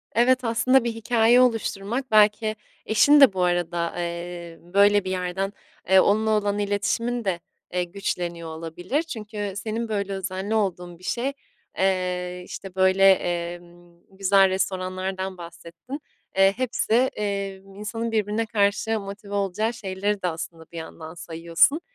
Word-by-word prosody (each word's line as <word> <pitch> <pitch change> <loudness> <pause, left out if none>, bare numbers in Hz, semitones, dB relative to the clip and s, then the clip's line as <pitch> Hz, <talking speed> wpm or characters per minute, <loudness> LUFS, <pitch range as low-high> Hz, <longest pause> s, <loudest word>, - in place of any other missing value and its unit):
Evet, 255 +3 +4
aslında 250 +3 +3
bir 235 -1 -1
hikâye 225 +2 +4
oluşturmak 230 +1 0
belki 215 0 +4 0.3
eşin 285 +7 +5
de 265 -8 +8
bu 185 -1 0
arada, 175 -1 0
eee, 170 -1 -5
böyle 200 +3 +4
bir 185 - -3
yerden, 185 +2 -2 0.4
eee, 190 0 +7
onunla 215 +3 +3
olan 205 -1 +1
iletişimin 210 +4 -1
de, 185 -3 0 0.3
eee, 180 0 +1
güçleniyor 175 -2 -4
olabilir. 165 - -3
Çünkü 210 - -5
senin 220 +2 -3
böyle 200 -2 -2
özenli 190 +2 -3
olduğun 180 -5 -2
bir - - -19
şey, 250 +8 -1 0.4
eee, 180 -1 0
işte, 190 0 -9
böyle, 190 +1 +5
emm, 175 -1 -4
güzel 195 0 +4
restoranlardan 185 0 -2
bahsettin. 170 - -9 0.4
Eee, 195 0 +6
hepsi, 255 -3 -1
emm, 200 -5 -1
insanın 225 +3 -4
birbirine 215 +1 0
karşı 215 +1 +1
motive 200 0 -8
olacağı 200 +3 0
şeyleri 200 -1 -2
de 180 - 0
aslında 165 -1 -6
bir 170 - -9
yandan 160 0 -8
sayıyorsun. 170 - +1
195 Hz, 135 wpm, -24 LUFS, 180-220 Hz, 0.4 s, de